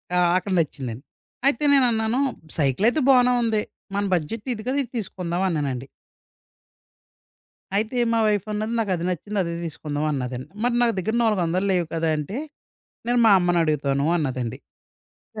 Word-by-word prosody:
ఆ! - - +4 0.2
అక్కడ 195 +1 -3
నచ్చిందండి. 135 -5 -3 0.4
అయితే 280 +1 +2
నేనన్నాను 235 -2 +3 0.4
సైకిల్ 145 - +1
అయితే 310 - -1
బానే 250 -1 +5
ఉంది. 220 -2 +1 0.3
మన 205 - +1
బడ్జెట్ 205 - -4
ఇది 215 -1 -7
కదా! 270 +2 0
ఇది 240 - -12
తీసుకుందాం 180 -4 -3
అన్నానండి. 135 -5 -2 1.9
అయితే 220 +4 0 0.2
మా 230 - +2
వైఫ్ 205 -1 +1
అన్నది 215 +2 -2
నాకది 185 -5 -1
నచ్చింది 200 +4 -3
అదే 170 0 -3
తీసుకుందాం 150 -1 -4
అన్నదండి. 125 -2 -4
మరి 245 0 +1
నా 240 - +4
దగ్గర 220 +5 -1
400 185 -3 +1
లేవు 175 -2 +1
కదా! 165 0 0
అంటే 170 - -4 0.7
నేను 245 0 +2
మా 210 - +7
అమ్మనడుగుతాను 150 -5 +1
అన్నదండి. 130 -7 -2 0.8
య - - -2
180 Hz, 145 wpm, -24 LUFS, 150-220 Hz, 1.9 s, మా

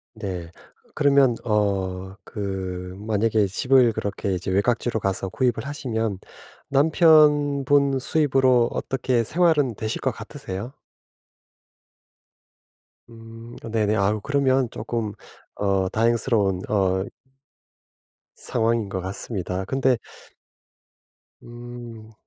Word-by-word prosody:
네. 90 -6 -6 0.4
그러면 140 -4 +4
어 95 -3 -1
그 95 -3 -5
만약에 110 0 +1
집을 125 +4 +3
그렇게 100 -1 -3
이제 90 +1 -4
외곽지로 115 +3 +1
가서 95 -1 -2
구입을 115 +2 0
하시면 115 -8 -2 0.5
남편분 145 -2 +4
수입으로 130 -4 +3
어떻게 130 -2 0
생활은 150 -3 +2
되실 110 +2 -4
것 - - +1
같으세요? 100 +8 -7 2.4
음. 115 0 -12 0.2
네네. 110 -1 +1
아우 105 +1 +1
그러면 135 -2 +1
쪼끔 110 -2 -3 0.4
어 95 -2 0
다행스러운 110 -3 +1
어 95 -2 +1 1.3
상황인 115 -2 0
것 95 - -3
같습니다. 95 0 -4
근데 130 +2 +1 1.4
음. 120 -2 -10
115 Hz, 205 characters per minute, -23 LUFS, 100-130 Hz, 2.4 s, 그러면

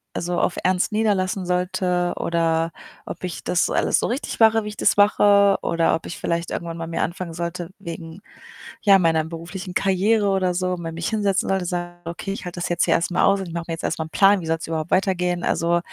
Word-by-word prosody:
also, 175 0 -1
auf - - 0
ernst 185 +2 +1
niederlassen 195 -3 0
sollte 180 0 0
oder 165 -1 0 0.3
ob - - -8
ich 180 - -5
das 180 - +1
alles - - +2
so - - 0
richtig 250 +1 -4
mache, 225 -1 +5
wie 210 - -5
ich 210 - -10
das - - +2
mache 200 -1 +5
oder 165 -1 +1
ob 160 - -6
ich - - -6
vielleicht 170 0 -2
irgendwann 170 -1 -4
mal 165 0 -5
mir 165 - -1
anfangen 170 0 -4
sollte 170 0 -4
wegen, 170 -1 -8 0.6
ja, 195 -2 +6
meiner 160 -2 +2
beruflichen 180 +3 -7
Karriere 200 +3 +2
oder 185 -2 +1
so, 185 0 -1
mal 165 -1 -5
mich 165 0 -3
hinsetzen 205 -3 0
sollte 190 -1 +1
und 175 - -3
sagen: 175 -1 -5
„Okay, 170 +3 -5
ich - - -7
halte 180 0 -6
das 175 - -2
jetzt 175 - +1
hier - - +3
erst 170 - -1
mal - - +2
aus 200 0 +3
und - - -4
ich - - -8
mache 170 0 -3
mir - - -1
jetzt 165 - -10
erst - - -1
mal 160 - -2
'n - - -11
Plan, 195 -1 +4
wie - - -7
soll's 165 0 -2
überhaupt 160 0 -3
weitergehen?“ 180 -2 +1
Also, 170 +1 +1
180 Hz, 235 wpm, -22 LUFS, 170-195 Hz, 0.6 s, ja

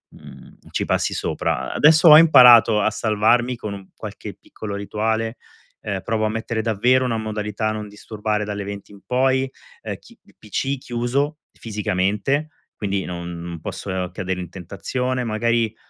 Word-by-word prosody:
mhmm, - - -14
ci - - -1
passi - - 0
sopra. 65 +2 -2
Adesso 155 +2 +5
ho 150 - +11
imparato 120 -8 +7
a 110 - +2
salvarmi, 120 +3 +1
con 105 -3 -6
un 95 -1 -10
qualche - - -8
piccolo 105 -2 -8
rituale, 110 +3 -2 0.4
ehm, 100 -2 -3
provo 110 0 0
a - - +1
mettere 110 +1 -3
davvero 120 +4 +2
una 115 -2 -1
modalità 110 0 -3
non 105 -1 -5
disturbare 105 0 -3
dalle 105 -1 -4
20:00 100 0 -8
in 100 -1 -15
poi. 130 +1 +1 0.3
Ehm, - - -5
chi - - -19
il - - -24
PC 135 +6 -3
chiuso, 130 +5 -2
fisicamente, 105 +7 -1 0.3
quindi 100 -2 -2
non 85 -1 -6
posso 90 +2 -4
cadere 95 0 -3
in 90 - -6
tentazione. 125 +8 -3
Magari, 115 0 0
110 Hz, 150 wpm, -21 LUFS, 100-120 Hz, 0.4 s, ho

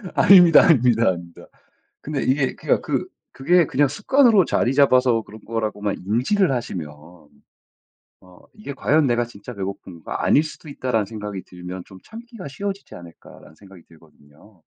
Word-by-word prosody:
아닙니다, 175 -4 +7
아닙니다, 120 - +3
아닙니다. 85 -2 -7 0.5
근데 145 -2 -4
이게 135 0 0
그러니까 - - -1
그 - - -3 0.2
그게 170 +6 +2
그냥 145 +2 +1
습관으로 215 - +3
자리 125 - 0
잡아서 130 -4 +3
그런 110 +1 -14
거라고만 105 -3 -3
인지를 135 - +1
하시면 95 - -4 1.3
'어 90 -1 -20
이게 215 -9 -9
과연 145 +2 +1
내가 120 -1 +1
진짜 120 +1 -12
배고픈가 95 -4 -6
아닐 150 - +4
수도 155 0 -10
있다.'라는 125 -7 -2
생각이 105 -3 -7
들면 90 +1 -9
좀 95 - -14
참기가 230 -2 -11
쉬워지지 200 +7 -7
않을까라는 85 -2 -15
생각이 95 -3 -17
들거든요. 80 +4 -22
120 Hz, 375 characters per minute, -21 LUFS, 95-150 Hz, 1.3 s, 아닙니다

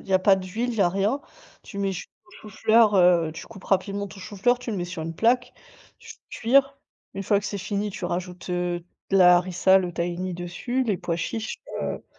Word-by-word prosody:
il - - -17
y - - -2
a 185 - +6
pas 195 +1 +4
d'huile, 200 +6 -3
il 230 - -5
y - - 0
a 175 - +4
rien. 200 +9 0 0.4
Tu 200 - -9
mets 195 -1 0
du 185 - -5 0.4
chou-fleur, 215 +1 +3
heu, 175 -3 +4
tu - - -9
coupes 195 - -13
rapidement 200 +1 0
ton 195 0 -12
chou-fleur, 210 +6 0
tu 250 -2 -6
le 205 - -2
mets 175 - -2
sur 175 -2 -6
une 165 +1 -5
plaque, 245 +5 +2 0.5
tu - - -11 0.2
cuire. 275 +4 +2 0.4
Une 195 - -4
fois 200 +1 +2
que 200 - -6
c'est 200 - -4
fini, 205 +1 -2
tu 185 - -7
rajoutes, 180 +1 -4
heu, 175 -1 -2 0.3
de 195 - +3
la 180 -2 +7
harissa, 185 +1 +3
le 180 -2 -3
tahini 175 +1 -3
dessus, 175 +9 -3
les 205 -5 0
pois 170 - -2
chiches, 220 +6 -4 0.3
heu, - - -4
190 Hz, 220 wpm, -25 LUFS, 180-210 Hz, 0.5 s, la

